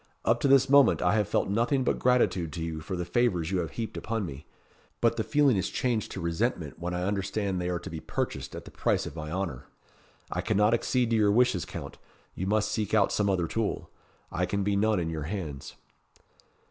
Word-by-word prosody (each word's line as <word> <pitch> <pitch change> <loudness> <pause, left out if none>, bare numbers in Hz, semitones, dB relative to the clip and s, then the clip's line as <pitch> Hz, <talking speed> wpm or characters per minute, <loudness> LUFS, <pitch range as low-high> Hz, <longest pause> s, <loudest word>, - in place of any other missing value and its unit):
Up 115 +1 +3
to 140 - +1
this 135 -1 +5
moment 140 0 +6
I 90 - +3
have 105 -3 +2
felt - - +1
nothing 120 +7 +1
but - - 0
gratitude 120 -10 +2
to 85 - -4
you 80 -1 -4
for 80 +4 -4
the 90 -1 -3
favours 90 -8 +1
you 95 - +1
have 85 - -2
heaped 115 -2 -4
upon 110 -2 -2
me; 70 -2 -8 0.5
but - - +3
the - - -1
feeling 145 -6 +3
is 95 +1 -1
changed 115 +1 -1
to - - -5
resentment 85 - -2
when 90 +1 -3
I 90 - -2
understand 100 -1 -1
they 90 - -2
are 90 - 0
to 85 - -8
be 80 - -5
purchased - - -4
at - - -8
the - - -11
price - - 0
of - - -7
my 75 -1 -5
honour. 85 -6 -4 0.6
I - - -1
cannot 105 0 +2
accede 120 0 +1
to - - +3
your 105 -2 +4
wishes, 120 -5 +3
Count. - - -8 0.3
You 95 - -4
must 105 +1 +1
seek 110 0 -1
out 100 -3 +4
some 105 -1 +1
other 90 -3 +1
tool. 110 +4 -2 0.4
I 90 +1 0
can 100 +2 -1
be 100 0 +1
none 105 0 +2
in 80 -1 -2
your 80 -2 -4
hands." 80 -9 -5
100 Hz, 225 wpm, -28 LUFS, 85-115 Hz, 0.6 s, moment